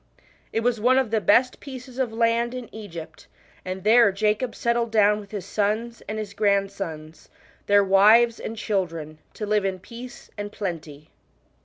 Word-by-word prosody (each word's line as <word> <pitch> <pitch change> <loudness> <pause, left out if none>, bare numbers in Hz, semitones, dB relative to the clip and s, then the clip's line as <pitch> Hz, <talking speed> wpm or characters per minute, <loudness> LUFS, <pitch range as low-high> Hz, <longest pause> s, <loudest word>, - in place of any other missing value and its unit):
It 225 - 0
was 230 -2 0
one 255 +3 +4
of 260 -5 +1
the 220 -1 +1
best 250 +5 +3
pieces 260 -1 -9
of 250 -4 0
land 230 +2 +1
in 250 -2 -8
Egypt, 170 -7 -9 0.4
and 185 0 -5
there 225 0 +6
Jacob 215 +4 0
settled 235 0 0
down 210 -1 +3
with 200 -1 -11
his 205 -3 -6
sons 220 +3 -2
and 215 - -3
his 210 -2 -5
grandsons, 195 -7 -2 0.4
theii; 200 -1 +4
wiv^s 220 +5 +5
und 225 - -5
children, 165 -8 -3 0.2
to 215 - -4
live 210 -1 +1
in 190 -1 -1
peace 240 +6 -11
and 205 0 -5
plenty. 160 -7 -6
210 Hz, 165 wpm, -24 LUFS, 195-235 Hz, 0.4 s, there